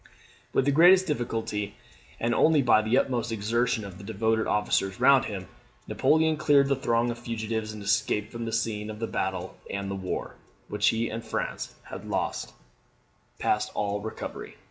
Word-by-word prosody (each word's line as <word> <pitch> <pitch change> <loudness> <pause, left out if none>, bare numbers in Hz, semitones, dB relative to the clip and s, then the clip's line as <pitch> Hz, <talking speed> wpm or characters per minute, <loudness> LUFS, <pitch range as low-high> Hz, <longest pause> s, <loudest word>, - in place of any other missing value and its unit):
] - - -29
With 130 - +2
the 145 - +3
greatest 180 +5 +7
difficulty, 110 - -2 0.4
and 120 +1 +1
only 155 +2 +4
by 120 -3 +5
the 110 +4 +2
utmost 120 -4 0
exertion 115 +1 0
of 95 -1 -10
the - - -10
devoted 110 +1 0
officers 95 -2 0
round 140 -1 +6
him, 95 -3 -5 0.4
Napoleon 160 0 +2
cleared 145 -2 +4
the 140 - +3
throng 120 -2 +1
of 120 - -7
fugitives, 110 -2 -3
and 105 -1 -8
escaped 100 +1 0
from 115 0 -5
the 115 - -3
scene 105 -2 -2
of 105 - -6
the 115 - -2
battle 95 -3 -3
and 100 0 -3
the - - -2
war, 95 -1 -4 0.3
which - - +1
he 115 +1 +2
and 115 +1 -5
France - - -4
had - - -9
lost - - -2 0.9
past - - 0
all 105 0 -1
recovery. 110 +1 -7
115 Hz, 175 wpm, -27 LUFS, 105-125 Hz, 0.9 s, greatest